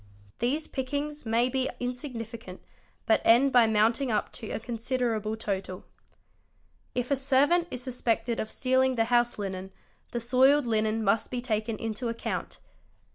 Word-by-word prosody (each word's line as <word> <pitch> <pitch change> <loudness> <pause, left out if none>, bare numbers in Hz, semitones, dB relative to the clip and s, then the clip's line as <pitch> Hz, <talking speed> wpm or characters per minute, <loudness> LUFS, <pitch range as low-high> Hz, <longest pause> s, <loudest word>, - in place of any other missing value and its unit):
These 280 +7 0
pick 260 -2 -5
ings 295 -2 -3
may 230 +2 +3
be 260 0 0
insignificant 235 -6 -6 0.4
but 220 - +3
end 250 +4 +5
by 245 -3 +6
mounting 225 +5 +2
up 210 - 0
to 220 - -7
a - - -3
considerable 230 -2 -2
total. 190 -3 -4 1.1
'Ifa 250 +3 +1
servant 280 +6 +3
is 250 -3 -5
suspected 235 -2 -1
of 220 - -3
stealing 260 +1 +2
the 225 -1 +2
house 240 0 +3
linen, 190 -2 -5 0.4
the 240 - -3
soiled 260 +4 +4
linen 220 -1 0
must 215 +2 +1
be 250 - -3
taken 220 -2 -1
into 225 +2 -3
account. 230 0 -4
240 Hz, 145 wpm, -28 LUFS, 220-260 Hz, 1.1 s, by